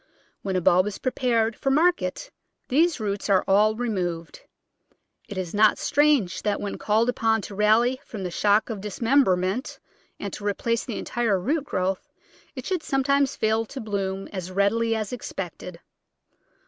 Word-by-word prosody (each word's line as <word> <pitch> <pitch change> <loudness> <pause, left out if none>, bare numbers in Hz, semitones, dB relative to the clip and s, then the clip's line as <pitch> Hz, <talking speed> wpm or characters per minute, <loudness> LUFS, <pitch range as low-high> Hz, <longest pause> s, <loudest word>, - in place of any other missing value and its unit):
When 190 -1 -3
a 185 - +1
bulb 180 +3 +4
is 210 - -4
pre 255 - -2
pared 230 -3 +1
for 270 - -2
market 315 - +1 0.4
these 320 +4 +2
roots 205 -1 -3
are 195 -2 +4
all 210 +2 +4
removed. 180 -8 -3 0.9
It 205 - -6
is 180 -3 -4
not 210 0 +4
strange 285 -11 +2
that 205 -1 -1
when 205 - -5
called 220 +2 +2
upon 225 -3 +1
to - - -8
rally 225 +5 +3
from 210 -4 -7
the 180 - -3
shock 210 +5 +2
of 210 -3 -5
dismemberment 210 0 +1 0.4
and 200 -2 -5
to - - -7
replace 230 +3 -1
the 235 - -5
entire 225 -5 0
root 285 - -1
growth 185 -6 -2 0.5
it - - -7
should 370 -3 -1
sometimes 275 0 +1
fail 220 +1 +1
to 270 - -7
bloom 195 -3 -3
as 185 -2 -5
readily 215 +4 +1
as 215 0 -3
expected. 180 -6 -6
215 Hz, 160 wpm, -25 LUFS, 195-245 Hz, 0.9 s, bulb